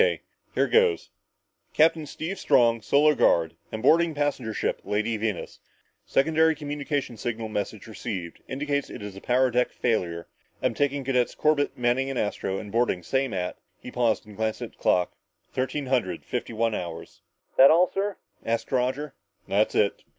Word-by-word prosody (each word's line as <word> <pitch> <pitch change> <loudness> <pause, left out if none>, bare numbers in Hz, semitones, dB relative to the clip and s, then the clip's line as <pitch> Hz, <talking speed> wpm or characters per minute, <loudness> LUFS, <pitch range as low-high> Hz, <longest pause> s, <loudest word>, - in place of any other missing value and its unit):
K. 485 0 +2 0.3
here - - +3
goes 460 -2 +2 0.6
Captain 160 -1 +3
Steve 170 +6 -5
Strong 115 -2 +4
Solar 150 +6 +4
Guard 85 - +3 0.2
am 110 +1 -5
boarding 165 +3 +4
passenger 145 -6 -1
ship - - -2
Lady 110 +2 -1
Venus. 105 -3 -3 0.5
Secondary 160 +3 +3
communications 145 -5 -3
signal 115 -2 -3
message 105 0 -4
received 95 -5 -6
indicates 140 +1 -2
it - - -8
is 100 -1 -7
power 125 +3 +2
deck 125 +1 +2
failure. 85 -8 -1 0.4
Am - - +2
taking 145 -1 0
cadets 125 -2 +1
Corbett, 145 -2 +1
Manning 125 +2 +1
and 135 - -3
Astro 100 -3 -2
and 105 0 -7
boarding 115 -6 +1
same 130 +5 0
at" 90 -2 -3 0.2
he 125 - -9
paused 120 -4 +1
and 105 -1 -13
glanced 110 0 -2
at - - -7
the - - -28
clock 90 -1 +2 0.4
"thirteen 130 +3 -2
hundred 120 -10 -1
fifty 120 -1 -3
one 115 0 0
hours!" 85 -4 -6 0.3
"That 135 - +8
all, 175 +3 +5
sir?" 200 0 -1 0.3
asked 115 0 -2
Roger. 130 +3 0 0.3
"That's 105 +2 +1
it. 100 - +2
125 Hz, 165 wpm, -26 LUFS, 110-145 Hz, 0.6 s, That